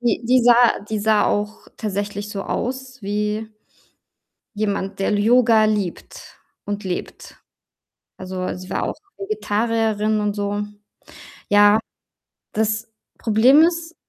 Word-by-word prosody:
Die 240 -2 +1
die 250 +1 +4
sah 240 0 +5
die 215 -1 -2
sah 215 0 +3
auch 210 +1 -2
tatsächlich 205 -1 -4
so 200 -2 -4
aus 255 -1 -4
wie 210 +2 -2 1.1
jemand, 200 -2 -2
der 195 - +1
L 205 - +1
Yoga 225 -1 +4
liebt 205 -5 -4 0.3
und 205 0 -4
lebt. 180 -1 -6 0.8
Also, 185 0 -7
weil 185 - -3
sie 185 0 -10
war - - -1
auch - - -3 0.2
Vegetarierin 220 - 0
und 205 0 -1
so. 205 0 -2 0.9
Ja, 205 +1 +6 0.7
das 220 +1 -1 0.3
Problem 240 +7 +5
ist 335 0 0
215 Hz, 125 wpm, -21 LUFS, 205-235 Hz, 1.1 s, Ja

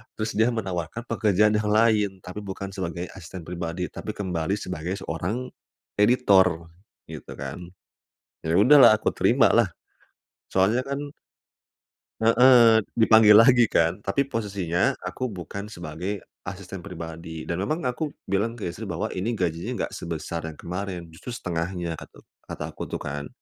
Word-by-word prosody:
terus 110 0 -2
dia 115 +3 +4
menawarkan 95 0 -4
pekerjaan 105 -2 +3
yang 105 - -2
lain. 105 -3 +3
Tapi 90 +3 -6
bukan 100 0 -6
sebagai 90 -2 -4
asisten 90 -1 -9
pribadi, 85 +1 -4
tapi - - -5
kembali 90 -2 -1
sebagai 90 -1 -4
seorang 95 +10 -3 0.5
editor, 95 -8 +4 0.4
gitu - - -8
kan. 75 +7 -7 0.7
Iya 80 +2 0
sudahlah 135 +3 +8
aku - - 0
terima - - +4
lah, - - +4 0.8
soalnya 100 +6 +3
kan 140 +1 -4 1.1
Heeh, 115 0 +7 0.2
dipanggil 110 -2 +7
lagi 120 +1 +7
kan. 85 +2 +1
Tapi 140 +6 0
posisinya 100 -6 0
aku 110 +8 -3
bukan 100 0 -7
sebagai 90 +1 -5 0.2
asisten 95 -1 -7
pribadi 80 -3 -8
dan 85 +2 -3
memang 155 - -2
aku 125 +5 -1 0.2
bilang 105 +5 -1
ke 115 - -9
istri 105 +5 -8
bahwa 85 -2 -3
ini 105 +6 -2
gajinya 85 -4 -2
nggak - - -4
sebesar 80 0 -5
yang 80 - -7
kemarin, 90 -1 -6
justru 120 +9 -8
setengahnya 85 -3 -3
katu - - -14 0.2
kata - - -5
aku - - -12
tuh - - -4
kan. 75 0 -5
95 Hz, 145 wpm, -25 LUFS, 85-110 Hz, 1.1 s, sudahlah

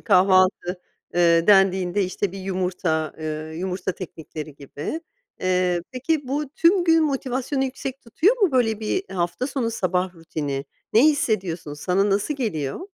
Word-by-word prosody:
kahvaltı, 185 -2 +3 0.3
eee, 170 -1 +4
dendiğinde, 195 -1 +4
işte, 185 +1 -2
1 195 - -7
yumurta, 180 -4 -1
eee, 155 0 -5
yumurta 185 0 -2
teknikleri 155 -4 -8
gibi. 145 - -6 0.4
Eee, 180 -1 +1
peki 275 +1 -1
bu 290 +1 -1
tüm 345 +4 +3
gün 325 -1 +5
motivasyonu 270 -1 -1
yüksek 265 0 -5
tutuyor 345 - +2
mu, 350 -8 +4
böyle, 225 -4 +2
bir 370 - -1
hafta 175 +7 -1
sonu 255 -5 -1
sabah 185 -2 -1
rutini? 145 -4 -4 0.3
Ne 220 - +6
hissediyorsun? 190 - +1
Sana 190 +6 +1
nasıl 205 +9 +1
geliyor? 175 - -2
190 Hz, 140 wpm, -23 LUFS, 175-255 Hz, 0.4 s, Ne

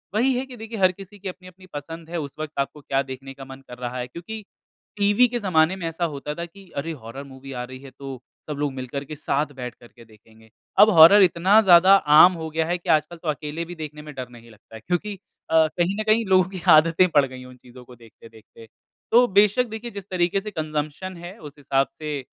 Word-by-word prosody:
वही 255 +5 +3
है 260 - -2
कि 260 -2 -11
देखिए 225 0 -7
हर 185 -1 +5
किसी 195 +2 -13
की 195 - -8
अपनी-अपनी 185 0 -13
पसंद 165 +3 -8
है, 175 - -4
उस 140 -3 -7
वक़्त 155 -1 -5
आपको 140 +2 -3
क्या 135 0 0
देखने 135 0 -9
का 135 0 -11
मन 135 0 -11
कर 125 - -9
रहा 125 0 -5
है 125 - -4
क्योंकि 180 - -8 0.5
टीवी 205 +4 +4
के 240 0 -3
ज़माने 180 -4 +2
में 175 -3 -5
ऐसा 165 +1 -2
होता 150 -2 -5
था 170 - -5
कि 195 +2 -17
अरे, 155 +4 -3
हॉरर 135 -1 -9
मूवी 135 0 -12
आ 125 -1 -4
रही 130 +1 -9
है 135 0 -13
तो 135 -3 -8 0.3
सब 150 - -4
लोग 145 -2 -1
मिलकर 130 +1 -5
के 155 - -8
साथ 145 +1 -1
बैठकर 125 -2 -8
के 115 -1 -18
देखेंगे। 110 0 -21 0.3
अब 210 +2 +8
हॉरर 170 +6 +9
इतना 185 +4 +4
ज़्यादा 185 0 +7 0.2
आम 180 +4 +9
हो 160 -2 -6
गया 160 +1 -1
है 175 +1 0
कि 175 - -10
आजकल 155 +2 +2
तो 165 - -10
अकेले 150 +2 -4
भी 175 +1 -9
देखने 150 -2 -8
में 150 0 -10
डर 130 -2 -6
नहीं 115 -1 -15
लगता 110 +1 -17
है 110 - -10
क्योंकि 195 +3 -2 0.3
अ, 160 -1 +4
कहीं 175 +3 +1
न - - 0
कहीं 220 +1 +3
लोगों 190 -1 +4
की 185 -3 -8
आदतें 165 +3 +5
पड़ 145 -4 +4
गई 130 -1 -10
हैं 125 - -11
उन 125 0 -14
चीज़ों 125 0 -15
को 125 - -14
देखते-देखते। 115 0 -17 0.4
तो 245 +2 +6
बेशक 210 +4 +3
देखिए 220 +2 -7
जिस 200 -2 -9
तरीके 185 +1 0
से 210 +1 -7
कंजम्पशन 155 +2 -4
है 175 +5 -10
उस 150 -2 -12
हिसाब 135 -2 0
से 150 -2 -4
160 Hz, 240 wpm, -23 LUFS, 135-185 Hz, 0.5 s, हॉरर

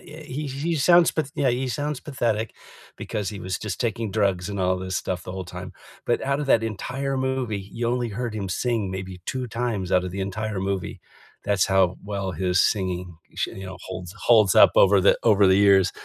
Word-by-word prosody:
eh, 155 - -10
he 150 +1 -5
he 145 +5 -2
sounds 170 +4 +5
p 160 - 0
yeah, 135 -3 +2
he 130 +2 -1
sounds 145 +4 -2
pathetic 115 -6 -2 0.4
because 105 -2 -3
he 100 -2 -7
was, 95 +1 -3
just, 105 -3 -5
taking 115 -3 -2
drugs 100 -3 0
and 100 -1 -4
all 90 0 +1
this 95 -1 -4
stuff 90 -3 -3
the 90 - -7
whole 95 -1 -5
time, 90 +1 -8 0.3
but - - +1
outta 140 +2 0
that 115 -4 +3
entire 135 +5 -3
movie, 130 -5 -1
you 115 0 -2
only 120 -1 0
heard 115 +2 -4
him 100 -3 -4
sing 110 -2 -1
maybe 95 -1 -6
2 130 -1 -3
times 115 -5 -3
out 90 0 +3
of 90 - -4
the 100 - -5
entire 105 +1 -3
movie, 95 -1 -3 0.4
that's 100 -3 +2
how 95 -2 +2
well 100 -2 -3
his 90 +1 0
singing, 90 -4 -1 0.2
sh - - -1 0.4
holds 90 -1 -7
holds 110 -5 +5
up - - +8
over 100 0 +6
the 100 - +4
over 105 -3 +5
the 95 - +5
years. 100 -2 +5
105 Hz, 200 wpm, -24 LUFS, 95-125 Hz, 0.4 s, up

